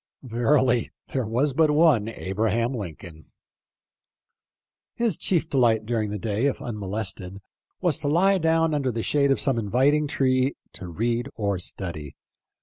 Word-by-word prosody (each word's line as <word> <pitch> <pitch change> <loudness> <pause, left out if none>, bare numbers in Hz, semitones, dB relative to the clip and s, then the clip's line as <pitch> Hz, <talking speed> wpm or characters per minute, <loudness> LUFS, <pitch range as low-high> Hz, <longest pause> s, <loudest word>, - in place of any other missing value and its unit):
Ver 120 +3 +2
ily 125 -3 +1 0.2
there 130 -5 -2
was 130 +6 0
but 155 +2 +3
one 150 -8 +4
Abraham 115 +4 -1
Lincoln! 85 - -8 1.7
His 235 -6 0
chief 170 -1 0
delight 120 -7 +2
during 110 -2 -1
the 105 - -3
day, 110 +5 0
if 140 - -2
unmolested, 100 -3 -4 0.4
was 175 -6 +1
to 145 - -3
lie 190 +6 +3
down 165 -1 +2
under 140 -3 0
the 115 -1 -3
shade 140 -1 +2
of 135 - +2
some 135 -5 +1
inviting 135 +8 +2
tree 130 -1 +1 0.2
to 90 - -8
read 120 +8 -2
and 100 -4 -1
study. 80 -6 -6
120 Hz, 145 wpm, -25 LUFS, 105-145 Hz, 1.7 s, one